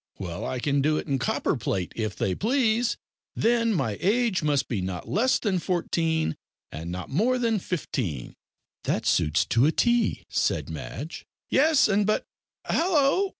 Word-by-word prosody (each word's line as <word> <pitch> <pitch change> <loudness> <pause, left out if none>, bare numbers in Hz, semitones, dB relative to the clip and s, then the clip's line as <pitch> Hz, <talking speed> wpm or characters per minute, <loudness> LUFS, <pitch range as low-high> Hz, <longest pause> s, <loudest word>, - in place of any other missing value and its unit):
Well, 90 -3 -5
I 130 - -2
can 140 +2 +1
do 155 +2 +2
it - - -3
in 140 -3 -1
copperplate, 100 - -1
if 110 -3 -2
they 95 - 0
please. 235 - +1 0.4
Then 230 0 +2
my 115 - -1
age 220 -1 +2
must 145 -3 +1
be 110 -6 -2
not 90 -1 -4
less 250 +6 +2
than 195 -5 0
fourteen, 165 - 0 0.4
and 80 +2 -6
not 90 +5 -6
more 230 - +2
than 230 -3 +1
fifteen." 120 - -3 0.5
"That - - -1
suits 75 +2 +2
to 120 +5 +3
a - - +3
T," 235 +4 +1
said - - -1
Madge. 80 - -7 0.2
"Yes; 300 +2 +5
and, 205 0 +2
but 215 - +1 0.4
hallo! 335 +2 +2
165 Hz, 155 wpm, -26 LUFS, -, 0.5 s, Yes